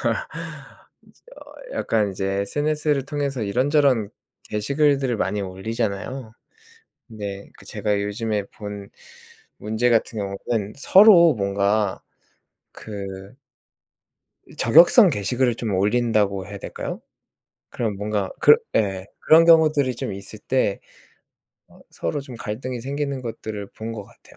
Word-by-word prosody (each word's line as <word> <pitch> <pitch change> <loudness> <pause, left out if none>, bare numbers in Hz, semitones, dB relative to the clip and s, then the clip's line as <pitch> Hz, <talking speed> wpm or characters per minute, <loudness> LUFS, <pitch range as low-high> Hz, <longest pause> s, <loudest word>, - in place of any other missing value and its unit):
이제 - - +1 1.7
어 - - -2
약간 105 -3 0
이제 95 +1 -4 0.2
SNS를 145 +4 -1
통해서 140 -4 -3
이런저런 130 0 +2 0.4
게시글들을 135 +2 +1
많이 105 0 -1
올리잖아요. 110 +5 -4 0.8
근데 100 -4 -7
그 - - -17
제가 105 -1 -2
요즘에 105 0 -2
본 105 -1 -8 0.7
문제 110 +3 0
같은 115 -1 +1
경우는 100 +1 -3
서로 175 0 +7
뭔가 100 -1 0 0.7
그 100 -1 -8 1.1
이 - - -18
저격성 170 - +6
게시글을 125 +1 0
좀 110 -3 -3
올린다고 105 -1 +1
해야 100 0 -8
될까요? - - -6 0.7
그런 110 -4 -3
뭔가 105 -1 -2
그 450 - +8 0.2
예 95 -2 0 0.2
그런 160 +1 +7
경우들이 155 -5 +4
좀 105 - -4
있을 100 +2 -9
때 115 -3 0 0.9
어 - - -20
서로 85 - -3
좀 130 -3 -10
갈등이 120 +3 -5
생기는 140 +1 -3
것들을 110 -3 -6
본 110 +1 -5
것 110 -3 -6
같아요. - - -21
110 Hz, 255 characters per minute, -22 LUFS, 100-135 Hz, 1.7 s, 그